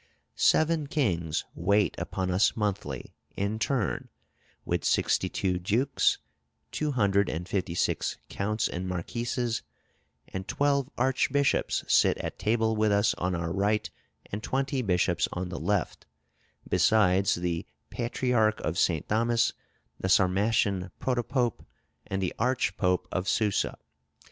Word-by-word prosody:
"Seven 160 -2 +3
kings 85 - 0
wait 100 +4 +2
upon 95 -1 -2
us 95 +6 +2
monthly, 100 - -3 0.2
in 100 +2 -1
turn, 110 -1 -1 0.6
with - - -1
sixty - - +2
two 90 -2 -1
dukes, 115 +10 +2 0.5
two 150 -1 -1
hundred 100 -4 +2
and 85 +3 -4
fifty 90 -4 -2
six - - 0
counts 105 +2 -1
and 90 +2 -4
marquises: 115 +6 -2 0.7
and 95 0 -5
twelve 140 -2 +1
archbishops 135 +2 +1
sit - - +4
at - - -5
table 110 0 +1
with 110 -1 +2
us 100 +1 +3
on 90 +1 0
our 85 0 -2
right, 105 +2 0 0.4
and 105 - -3
twenty 135 +2 -1
bishops 90 -5 +1
on 90 0 -3
the 85 - -5
left, 100 -4 -1 0.6
besides 100 -3 +3
the 85 -1 -2 0.2
patriarch 120 -3 +1
of 80 +4 -2
St. 80 -5 +1
Thomas, 115 +2 +2 0.5
the 95 - -2
Sarmatian 95 0 +2
Protopope, 125 -1 0 0.4
and 95 0 -2
the 90 - -1
Archpope 95 -7 +1
of 90 +1 -2
Susa.... 105 -3 +1
105 Hz, 125 wpm, -28 LUFS, 90-120 Hz, 0.7 s, sit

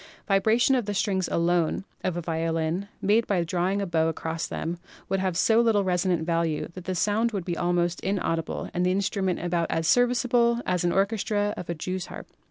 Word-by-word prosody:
The 195 - 0
vibration 220 +6 +3
of 245 -5 +1
the 205 - -2
strings 190 -2 0
alone 170 +1 +1 0.2
of 180 -2 -1
a - - -2
violin, 165 +2 -1 0.2
made 215 +3 +3
by 185 -4 +1
drawing 185 +3 0
a - - -1
bow 165 -3 +1
across 160 0 -3
them, 170 +2 -4 0.3
would 195 - +1
have 185 -2 -1
so 225 +4 +4
little 220 -4 +3
resonant 180 -2 0
value 165 -2 0
that 185 -1 -9
the 185 - -2
sound 215 +6 +1
would 190 -4 -3
be 175 - -2
almost 175 0 0
inaudible 175 -4 -2
and 180 - 0
the 180 - +2
instrument 190 -1 0
about 170 -1 0
as 165 0 0
serviceable 245 -1 +3
in 180 - +1
an 175 - +2
orchestra 205 +1 0
as 175 - -8
a 170 - -1
jew's 185 +3 -4
harp. - - -9
185 Hz, 200 wpm, -26 LUFS, 170-205 Hz, 0.3 s, so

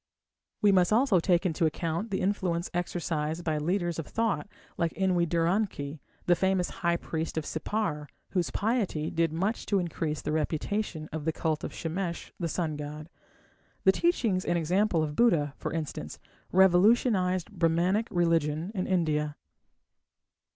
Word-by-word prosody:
We 205 - +6
must 180 -1 +4
also 225 -4 +4
take 175 +2 +2
into 165 -2 +2
account 165 +6 -2
the 195 - -1
influence 185 -3 -1
exercised 170 -2 -2
by 155 -2 0
leaders 175 +1 -1
of 165 - -5
thought 225 -2 -1 0.3
like 170 -1 0
En 190 -1 +1
we 170 -1 +2
dur 165 0 +1
an 200 +5 +2
ki, 145 -3 -7 0.2
the 175 - +5
famous 190 0 +1
high 170 -1 +2
priest 160 -1 -4
of 155 - -1
Sippar, 160 -3 -2 0.2
whose 180 -3 0
piety 205 -9 -1
did 165 -1 +1
much 195 +8 -1
to 200 - +2
increase 165 -4 -2
the - - -3
reputation 155 +2 -2
of 155 -1 -5
the 160 - +2
cult 155 -1 -2
of - - -4
Shamesh, 170 +1 -4
the 170 -2 -1
sun 160 -3 -2
god. 150 +2 -7 0.7
The 190 - +7
teachings 225 - +1
and 175 - +1
example 175 +1 +2
of 150 -1 -3
Buddha, 160 -11 +3
for - - -4
instance, 160 -2 -4 0.3
revolutionized 190 0 +4
Brahmanic 180 +4 +1
religion 165 0 +1
in 185 -4 -2
India. 150 -5 +1
175 Hz, 160 wpm, -29 LUFS, 160-190 Hz, 0.7 s, The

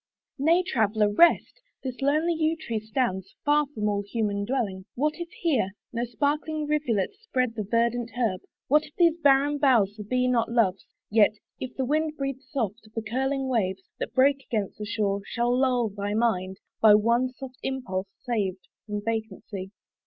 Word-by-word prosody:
Nay, 335 +6 +4
Traveller! 215 - +1
rest. 345 - +4 0.2
This 260 0 -5
lonely 305 +5 +2
yew 320 0 +1
tree 235 -8 -3
stands 215 -4 -2
Far 295 0 +3
from 220 -7 -3
all 205 -1 +1
human 205 -1 -2
dwelling: 205 -7 -2
what 300 +4 +1
if 340 0 -5
here 270 - 0 0.2
No 235 +1 -1
sparkling 295 +6 -1
rivulet 290 -9 0
spread 255 - -1
the 220 - -3
verdant 235 0 +1
herb; 215 -7 0 0.3
What 300 +3 +4
if 295 - -21
these 335 -2 +4
barren 285 -1 +4
boughs 230 -8 +4
the 210 - -7
bee 250 +4 +1
not 235 -2 +1
loves; 210 -6 +1 0.2
Yet, 215 -1 +5 0.2
if 255 -1 -6
the 265 - -1
wind 305 +3 0
breathe 275 -1 -3
soft, 235 -6 -4
the 225 - -2
curling 265 +4 -1
waves, 190 -6 0 0.2
That - - -4
break 275 +1 +4
against 215 -5 -3
the 210 - -4
shore, 200 -2 0
shall 240 +3 0
lull 250 -3 +2
thy 205 +1 -3
mind 190 -5 0 0.2
By 215 -2 +8
one 235 +4 +2
soft 260 -1 -10
impulse 205 -8 -3 0.2
saved 200 -6 -2 0.2
from 210 -1 -3
vacancy. 215 -3 -4
240 Hz, 170 wpm, -26 LUFS, 210-275 Hz, 0.3 s, By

